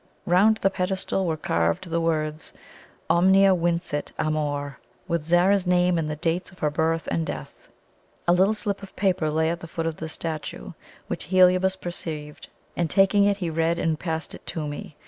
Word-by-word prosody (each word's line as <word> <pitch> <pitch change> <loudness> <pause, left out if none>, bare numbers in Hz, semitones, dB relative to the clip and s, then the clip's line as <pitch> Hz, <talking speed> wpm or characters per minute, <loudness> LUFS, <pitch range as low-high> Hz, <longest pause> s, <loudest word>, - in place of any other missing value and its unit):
Bound 200 +5 +4
the 195 - +1
pedestal 190 0 -1
were 160 -1 -1
carved 85 - 0
the 170 0 +1
words, 155 -1 -2 0.5
"Omnia 190 +2 +5
vincit 170 -4 -1
Amor," 145 -2 -2 0.3
with 170 -2 0
Zara's 180 +4 +3
name 180 -1 +3
and 155 -1 -2
the 150 - -2
dates 165 +4 -1
of 185 - -18
her 150 -3 0
birth 165 +2 0
and 165 - 0
death. - - -7 0.6
A 175 - +5
little 190 +4 +3
slip 205 -2 -3
of 195 - -11
paper 185 -5 +1
lay 160 +1 +1
at 170 - -4
the 165 - -9
foot 165 0 -4
of 165 -1 -2
the 160 - -5
statue, 160 -1 -5 0.3
which - - -5
Heliobas 185 +2 +4
perceived, 160 -5 -6 0.3
and 170 -2 0
taking 200 +2 +4
it 200 -1 +2
he 175 -4 -3
read 165 +1 +1
and 160 -2 0
passed 160 -2 -4
it - - -11
to 160 -4 -3
me. 145 0 -7
170 Hz, 185 wpm, -25 LUFS, 155-185 Hz, 0.6 s, Omnia